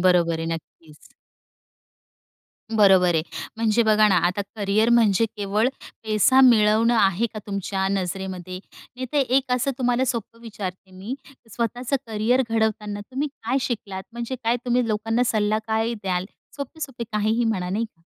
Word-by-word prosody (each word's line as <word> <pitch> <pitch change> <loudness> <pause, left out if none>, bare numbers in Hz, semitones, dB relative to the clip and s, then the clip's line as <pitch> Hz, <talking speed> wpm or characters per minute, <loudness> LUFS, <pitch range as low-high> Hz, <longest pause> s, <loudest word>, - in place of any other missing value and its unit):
बरोबर 175 -2 +3
आहे. 165 - -3
नक्कीच. 155 -1 -13 1.6
बरोबर 190 -5 +5
आहे. 160 - +2 0.3
म्हणजे, 225 +1 +2
बघा 215 -1 +4
ना. 190 - +3
आता 185 +3 -1
करिअर 210 +2 +2
म्हणजे, 225 -3 +4
केवळ 205 +3 +1 0.4
पैसा 220 +5 +4
मिळवणं 230 -1 +5
आहे 195 +2 +3
का 215 - -4
तुमच्या 195 -1 -2
नजरेमध्ये? 185 -1 -3 0.4
नाहीतर 255 +3 -2 0.2
एक 265 -1 +2
असं 250 +2 +1
तुम्हाला 250 0 +1
सोपं 230 -2 -4
विचारते 190 -4 -7
मी, 190 +7 -6 0.4
स्वतःच 240 +3 -3
करिअर 225 +4 +1
घडवताना 215 -2 -1
तुम्ही 265 +8 -3
काय 235 +4 0
शिकलात? 200 -6 -4
म्हणजे 235 +2 -4
काय 235 +2 +2
तुम्ही 245 -1 +1
लोकांना 225 +3 0
सल्ला 215 -2 +1
काय 220 +1 0
द्याल? 185 -1 -1 0.3
सोपे-सोपे 280 -4 -6
काहीही 220 +3 +1
म्हणा 190 -5 -1
नाही 210 +5 -1
का? 180 -7 -15
215 Hz, 140 wpm, -23 LUFS, 195-235 Hz, 1.6 s, बरोबर